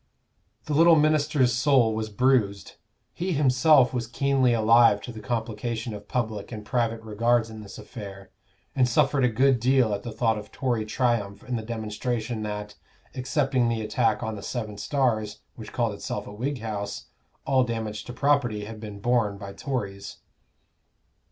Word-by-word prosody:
The 150 Hz, -, -3 dB
little 165 Hz, +3 st, +6 dB
minister's 150 Hz, -4 st, +3 dB
soul 120 Hz, -2 st, +3 dB
was 110 Hz, 0 st, -3 dB
bruised; 105 Hz, -4 st, +1 dB, 0.4 s
he 180 Hz, +1 st, -2 dB
himself 135 Hz, -2 st, +4 dB
was 120 Hz, -2 st, -2 dB
keenly 135 Hz, 0 st, +2 dB
alive 115 Hz, -1 st, +5 dB
to 125 Hz, -, -6 dB
the 110 Hz, -, -9 dB
complication 115 Hz, +1 st, -3 dB
of 105 Hz, 0 st, -9 dB
public 110 Hz, -4 st, -3 dB
and 105 Hz, -2 st, -7 dB
private 115 Hz, -1 st, -1 dB
regards 115 Hz, +1 st, +1 dB
in 110 Hz, -1 st, -9 dB
this 100 Hz, -, -10 dB
affair, 100 Hz, -3 st, -10 dB, 0.4 s
and 125 Hz, -2 st, +3 dB
suffered 140 Hz, +1 st, +2 dB
a 125 Hz, -, +4 dB
good 130 Hz, +2 st, +3 dB
deal 125 Hz, -2 st, +3 dB
at 100 Hz, -, -3 dB
the 120 Hz, -, -6 dB
thought 110 Hz, -1 st, 0 dB
of 105 Hz, -, -12 dB
Tory 120 Hz, -5 st, -1 dB
triumph 110 Hz, -4 st, -1 dB
in 125 Hz, -, -3 dB
the 115 Hz, -, -2 dB
demonstration 110 Hz, +1 st, -3 dB
that, 105 Hz, -1 st, -5 dB, 0.4 s
excepting 130 Hz, -2 st, 0 dB
the 115 Hz, -1 st, -1 dB
attack 110 Hz, 0 st, 0 dB
on 110 Hz, 0 st, -3 dB
the 100 Hz, -, -8 dB
Seven 110 Hz, -2 st, -5 dB
Stars, 110 Hz, -7 st, -1 dB
which -, -, -9 dB
called -, -, 0 dB
itself -, -, -5 dB
a -, -, -9 dB
Whig 125 Hz, +4 st, -3 dB
house, 105 Hz, -2 st, -4 dB, 0.4 s
all 130 Hz, -1 st, +3 dB
damage 110 Hz, -3 st, -4 dB
to -, -, -7 dB
property 125 Hz, -6 st, +1 dB
had 110 Hz, 0 st, -8 dB
been 105 Hz, -2 st, -8 dB
borne 115 Hz, -3 st, +1 dB
by 100 Hz, -1 st, -8 dB
Tories. 100 Hz, -8 st, -5 dB
115 Hz, 165 wpm, -26 LUFS, 105-130 Hz, 0.4 s, little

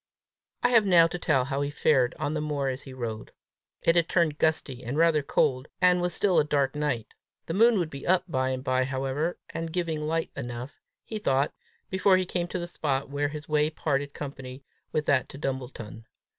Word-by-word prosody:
I 245 Hz, -, +5 dB
have 230 Hz, -3 st, +6 dB
now 175 Hz, -4 st, +6 dB
to 170 Hz, +2 st, -3 dB
tell 135 Hz, -7 st, +2 dB
how 140 Hz, +1 st, -2 dB
he 145 Hz, -, -1 dB
fared 135 Hz, -4 st, +2 dB
on 145 Hz, -, -2 dB
the 155 Hz, -, -1 dB
moor 145 Hz, -3 st, -1 dB
as 130 Hz, +1 st, -4 dB
he 135 Hz, -, -11 dB
rode. 115 Hz, -4 st, -6 dB, 0.5 s
It 165 Hz, -, +4 dB
had 170 Hz, -1 st, +3 dB
turned 165 Hz, -4 st, +1 dB
gusty 145 Hz, -5 st, 0 dB
and 125 Hz, +4 st, -3 dB
rather 165 Hz, -2 st, +4 dB
cold, 130 Hz, -1 st, +1 dB
and 180 Hz, -1 st, +4 dB
was 175 Hz, 0 st, 0 dB
still 185 Hz, +2 st, +3 dB
a -, -, +4 dB
dark 140 Hz, -3 st, +1 dB
night. 145 Hz, -7 st, -2 dB, 0.3 s
The 165 Hz, -, -4 dB
moon 230 Hz, +4 st, +5 dB
would 170 Hz, -4 st, -1 dB
be 140 Hz, 0 st, -7 dB
up 185 Hz, 0 st, +4 dB
by 130 Hz, -5 st, 0 dB
and 130 Hz, 0 st, -3 dB
by 130 Hz, -1 st, +1 dB
however, 135 Hz, +5 st, -2 dB
and 165 Hz, 0 st, -4 dB
giving 165 Hz, -3 st, -2 dB
light 160 Hz, +2 st, -1 dB
enough, 120 Hz, 0 st, -6 dB, 0.2 s
he 220 Hz, -, -4 dB
thought, 135 Hz, -7 st, +1 dB, 0.4 s
before 190 Hz, 0 st, +4 dB
he 185 Hz, -, 0 dB
came 175 Hz, -1 st, -2 dB
to 180 Hz, -, -4 dB
the 175 Hz, -, -3 dB
spot 140 Hz, -5 st, -2 dB
where 145 Hz, +1 st, 0 dB
his 150 Hz, 0 st, -7 dB
way 150 Hz, 0 st, +2 dB
parted 145 Hz, -2 st, -1 dB
company 135 Hz, -2 st, -7 dB, 0.3 s
with 155 Hz, -, -1 dB
that 140 Hz, -3 st, +2 dB
to -, -, -9 dB
Dumbleton. 125 Hz, -5 st, -5 dB
150 Hz, 210 wpm, -27 LUFS, 135-165 Hz, 0.5 s, have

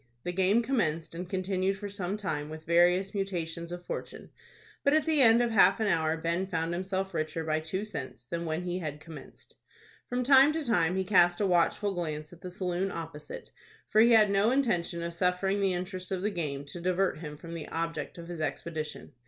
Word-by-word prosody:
The 180 Hz, -, -2 dB
game 190 Hz, +6 st, +2 dB
commenced, 170 Hz, -, -1 dB
and 175 Hz, +1 st, -6 dB
continued 190 Hz, 0 st, -1 dB
for 205 Hz, -, -6 dB
some 200 Hz, 0 st, -3 dB
time 150 Hz, -8 st, -3 dB
with 155 Hz, 0 st, -8 dB
various 175 Hz, +3 st, +3 dB
mutations 170 Hz, -4 st, -3 dB
of 175 Hz, 0 st, -7 dB
fortune; -, -, -6 dB, 0.5 s
but 280 Hz, +2 st, +4 dB
at 310 Hz, -1 st, +2 dB
the 315 Hz, -3 st, +3 dB
end 230 Hz, -1 st, +6 dB
of 235 Hz, -, 0 dB
half 195 Hz, -2 st, +5 dB
an 220 Hz, -, +1 dB
hour 165 Hz, -4 st, +1 dB
Ben 170 Hz, +3 st, -1 dB
found 165 Hz, -2 st, -2 dB
himself 190 Hz, +1 st, -2 dB
richer 155 Hz, 0 st, -2 dB
by 155 Hz, 0 st, 0 dB
two 185 Hz, +6 st, -3 dB
cents 135 Hz, -, -7 dB
than 170 Hz, +7 st, -4 dB
when 160 Hz, +2 st, -2 dB
he 180 Hz, 0 st, -2 dB
had 150 Hz, -4 st, -5 dB
commenced. 160 Hz, 0 st, -13 dB, 0.5 s
From 250 Hz, +1 st, 0 dB
time 270 Hz, +3 st, +6 dB
to 320 Hz, -1 st, -2 dB
time 175 Hz, -7 st, +2 dB
he 190 Hz, -, +1 dB
cast 175 Hz, -2 st, +4 dB
a 205 Hz, -, +2 dB
watchful 190 Hz, +3 st, +2 dB
glance 155 Hz, -3 st, -4 dB
at 175 Hz, -, -15 dB
the 180 Hz, -, -6 dB
saloon 180 Hz, +1 st, -2 dB
opposite, 160 Hz, -3 st, -8 dB, 0.4 s
for 215 Hz, -, +5 dB
he 235 Hz, -, +6 dB
had 215 Hz, -2 st, +6 dB
no 200 Hz, +3 st, +3 dB
intention 195 Hz, -10 st, 0 dB
of 170 Hz, 0 st, -4 dB
suffering 180 Hz, +3 st, +1 dB
the 195 Hz, -2 st, +2 dB
interest 185 Hz, +1 st, -5 dB
of 185 Hz, -1 st, -2 dB
the 210 Hz, -, +1 dB
game 145 Hz, -6 st, -3 dB
to 145 Hz, +5 st, -8 dB
divert 185 Hz, 0 st, 0 dB
him 150 Hz, -2 st, -7 dB
from 165 Hz, +2 st, -9 dB
the 165 Hz, -2 st, -6 dB
object 165 Hz, -2 st, -4 dB
of 170 Hz, -1 st, -9 dB
his 170 Hz, -2 st, -6 dB
expedition. 155 Hz, +1 st, -4 dB
180 Hz, 210 wpm, -29 LUFS, 165-195 Hz, 0.5 s, end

